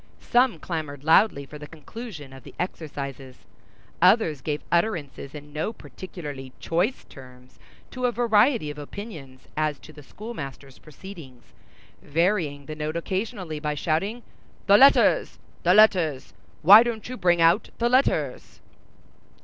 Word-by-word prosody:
Some 245 Hz, 0 st, +2 dB
clamored 150 Hz, -5 st, -5 dB
loudly 160 Hz, -2 st, +4 dB
for 150 Hz, +2 st, -11 dB
the 150 Hz, -, -9 dB
conclusion 160 Hz, -, -10 dB
of 135 Hz, -, -12 dB
the -, -, -14 dB
exercises; 140 Hz, -7 st, -6 dB, 0.6 s
others 180 Hz, -, +4 dB
gave 150 Hz, 0 st, -3 dB
utterances 165 Hz, -7 st, -1 dB
in 145 Hz, 0 st, -11 dB
no 155 Hz, +8 st, -2 dB
particularly 145 Hz, -, -9 dB
choice 180 Hz, +10 st, -1 dB
terms 125 Hz, -1 st, -16 dB, 0.3 s
to 255 Hz, -1 st, -1 dB
a -, -, 0 dB
variety 230 Hz, -, +2 dB
of 150 Hz, -, -10 dB
opinions 145 Hz, -, -10 dB
as 155 Hz, -1 st, -1 dB
to 155 Hz, -, -14 dB
the 150 Hz, -, -13 dB
schoolmaster's 140 Hz, -, -9 dB
proceedings, 155 Hz, -6 st, -13 dB, 0.5 s
varying 160 Hz, -3 st, 0 dB
the 155 Hz, -, -6 dB
note 155 Hz, +2 st, -3 dB
occasionally 185 Hz, -3 st, -4 dB
by 150 Hz, 0 st, -2 dB
shouting, 195 Hz, +11 st, -2 dB, 0.4 s
"The 200 Hz, -, +6 dB
letters! 275 Hz, +1 st, +5 dB, 0.2 s
the 180 Hz, +2 st, +4 dB
letters! 180 Hz, -10 st, +3 dB, 0.3 s
why 200 Hz, +7 st, +10 dB
don't 230 Hz, -3 st, -3 dB
you 255 Hz, -, -6 dB
bring 175 Hz, -6 st, +2 dB
out 165 Hz, +6 st, +3 dB
the 235 Hz, -, +1 dB
letters?" 255 Hz, +3 st, 0 dB
160 Hz, 135 wpm, -25 LUFS, 145-210 Hz, 0.6 s, why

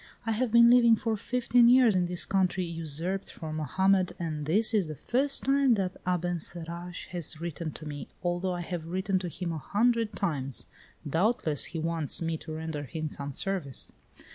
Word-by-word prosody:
I 225 Hz, -, 0 dB
have 230 Hz, +1 st, 0 dB
been 235 Hz, +1 st, +7 dB
living 235 Hz, -2 st, +6 dB
for 225 Hz, 0 st, -1 dB
fifteen 240 Hz, +1 st, +3 dB
years 245 Hz, -4 st, +6 dB
in 180 Hz, -1 st, +2 dB
this 180 Hz, 0 st, -2 dB
country 190 Hz, -1 st, +1 dB
usurped 165 Hz, +3 st, -3 dB
from 155 Hz, -1 st, -6 dB
Mohammed, 185 Hz, +4 st, +2 dB
and 155 Hz, -3 st, -4 dB
this 215 Hz, +7 st, +4 dB
is 200 Hz, -6 st, +2 dB
the 155 Hz, -, -6 dB
first 270 Hz, -, +1 dB
time 275 Hz, -2 st, +3 dB
that 190 Hz, -3 st, -3 dB
Abencerrage 175 Hz, 0 st, -2 dB
has 165 Hz, -3 st, 0 dB
written 170 Hz, -1 st, -4 dB
to 155 Hz, -, -10 dB
me, 145 Hz, -1 st, -6 dB, 0.2 s
although 175 Hz, +1 st, -1 dB
I 175 Hz, -, -4 dB
have 170 Hz, -2 st, -5 dB
written 190 Hz, +2 st, 0 dB
to 180 Hz, -1 st, -4 dB
him 175 Hz, 0 st, -4 dB
a 160 Hz, -, -4 dB
hundred 225 Hz, -, +1 dB
times. 140 Hz, -9 st, -1 dB, 0.4 s
Doubtless 160 Hz, -, +1 dB
he 165 Hz, -, -4 dB
wants 165 Hz, -2 st, -1 dB
me 165 Hz, -1 st, -2 dB
to 155 Hz, -, -9 dB
render 160 Hz, -1 st, -4 dB
him 155 Hz, +3 st, -5 dB
some 140 Hz, -1 st, -5 dB
service." 160 Hz, -4 st, -2 dB
175 Hz, 180 wpm, -28 LUFS, 160-210 Hz, 0.4 s, been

